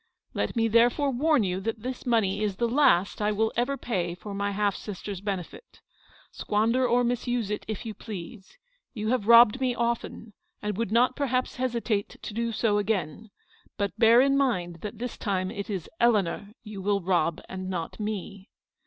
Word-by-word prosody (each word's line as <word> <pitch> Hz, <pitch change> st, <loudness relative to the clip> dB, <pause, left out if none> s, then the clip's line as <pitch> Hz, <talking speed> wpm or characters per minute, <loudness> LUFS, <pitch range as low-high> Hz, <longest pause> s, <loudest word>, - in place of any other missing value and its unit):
" -, -, -44 dB
Let -, -, -2 dB
me 225 Hz, -1 st, +2 dB
therefore 240 Hz, +5 st, +3 dB
warn 290 Hz, 0 st, +2 dB
you 185 Hz, -1 st, -1 dB
that 220 Hz, +2 st, -4 dB
this 255 Hz, 0 st, -5 dB
money 215 Hz, -4 st, +2 dB
is 205 Hz, -3 st, -1 dB
the 235 Hz, +4 st, 0 dB
last 230 Hz, -8 st, +3 dB
I 210 Hz, 0 st, +2 dB
will 220 Hz, +1 st, 0 dB
ever 250 Hz, +4 st, 0 dB
pay 180 Hz, -9 st, -2 dB
for 200 Hz, +3 st, -8 dB
my 200 Hz, 0 st, -1 dB
half 200 Hz, 0 st, 0 dB
sister's 200 Hz, -1 st, -6 dB
benefit. 200 Hz, -, -6 dB, 0.5 s
Squander 230 Hz, +5 st, +1 dB
or 245 Hz, +1 st, +3 dB
misuse 240 Hz, -2 st, -1 dB
it 210 Hz, -, -3 dB
if 220 Hz, +1 st, -5 dB
you 220 Hz, -, -4 dB
please. 200 Hz, -, -9 dB, 0.4 s
You 215 Hz, -1 st, -2 dB
have 240 Hz, -4 st, 0 dB
robbed 235 Hz, +1 st, +7 dB
me 250 Hz, -2 st, +1 dB
often, 235 Hz, -2 st, -3 dB, 0.3 s
and 210 Hz, -1 st, -3 dB
would 230 Hz, -1 st, -2 dB
not 245 Hz, +3 st, +3 dB
perhaps 255 Hz, -3 st, -1 dB
hesitate 235 Hz, -5 st, -1 dB
to -, -, -7 dB
do 235 Hz, +1 st, -1 dB
so 215 Hz, -2 st, +1 dB
again. 205 Hz, -1 st, -2 dB, 0.5 s
But 200 Hz, -1 st, -2 dB
bear 230 Hz, +1 st, +6 dB
in 275 Hz, +1 st, +3 dB
mind, 180 Hz, -11 st, 0 dB
that 210 Hz, +1 st, -6 dB
this 245 Hz, +2 st, -5 dB
time 190 Hz, -3 st, -1 dB
it 200 Hz, -2 st, -6 dB
is 190 Hz, -5 st, -4 dB
Eleanor 205 Hz, -4 st, +2 dB
you 210 Hz, -3 st, -8 dB
will 200 Hz, +1 st, +1 dB
rob 170 Hz, -3 st, +1 dB
and 185 Hz, 0 st, -6 dB
not 175 Hz, 0 st, -4 dB
me. 205 Hz, -1 st, -5 dB
215 Hz, 185 wpm, -27 LUFS, 200-240 Hz, 0.5 s, robbed